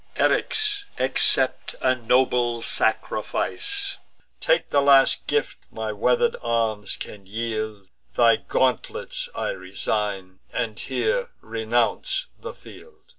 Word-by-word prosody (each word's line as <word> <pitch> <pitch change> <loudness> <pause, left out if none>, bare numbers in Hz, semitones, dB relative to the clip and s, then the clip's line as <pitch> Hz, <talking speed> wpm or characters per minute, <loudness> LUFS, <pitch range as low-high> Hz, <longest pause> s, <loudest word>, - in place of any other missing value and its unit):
Eryx, 420 -2 +1
accept - - +3
a 130 - +3
nobler 120 -1 +1
sacrifice; 400 -1 0 0.4
Take - - +1
the 140 - +4
last 140 -1 +4
gift - - -1
my 110 -1 -4
wither'd 125 - +2
arms 115 -3 -1
can 100 -2 -9
yield: 110 -2 -4 0.3
Thy 115 -1 +5
gauntlets 485 - -1
I - - -2
resign, 100 - -3
and 115 -4 -3
here 485 +2 -1
renounce 115 - 0
the - - -8
field." 470 -2 -14
120 Hz, 105 wpm, -24 LUFS, -, 0.4 s, Thy